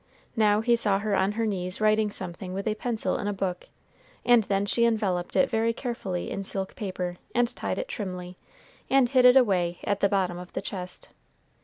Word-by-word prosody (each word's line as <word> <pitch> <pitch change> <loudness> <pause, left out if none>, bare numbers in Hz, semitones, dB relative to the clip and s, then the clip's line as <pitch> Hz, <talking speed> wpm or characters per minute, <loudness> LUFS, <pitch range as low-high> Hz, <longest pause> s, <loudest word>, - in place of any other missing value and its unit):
Now 210 -2 +3
he 235 +1 +3
saw 210 -4 +2
her 205 0 -1
on 190 +2 +1
her 225 +1 -1
knees 185 -3 -3
writing 215 0 +3
something 185 -1 -6
with 195 +3 -3
a 215 - +2
pencil 225 +1 -2
in 205 - -3
a 205 - 0
book, 185 -2 -4 0.6
and 240 -3 +5
then 195 0 0
she 235 +3 +2
enveloped 205 -6 0
it 270 - +4
very 230 -1 +1
carefully 220 -8 -4
in 195 - -3
silk 190 0 -4
paper, 180 -3 -4 0.2
and 240 0 +2
tied - - -3
it - - -3
trimly, 180 - -6 0.5
and 270 -2 +4
hid 255 -1 +4
it 250 +1 +8
away 180 -8 +2
at 205 -1 0
the 200 - +3
bottom 185 -3 0
of 180 0 -11
the - - -3
chest. 180 -3 -7
205 Hz, 200 wpm, -27 LUFS, 185-230 Hz, 0.6 s, it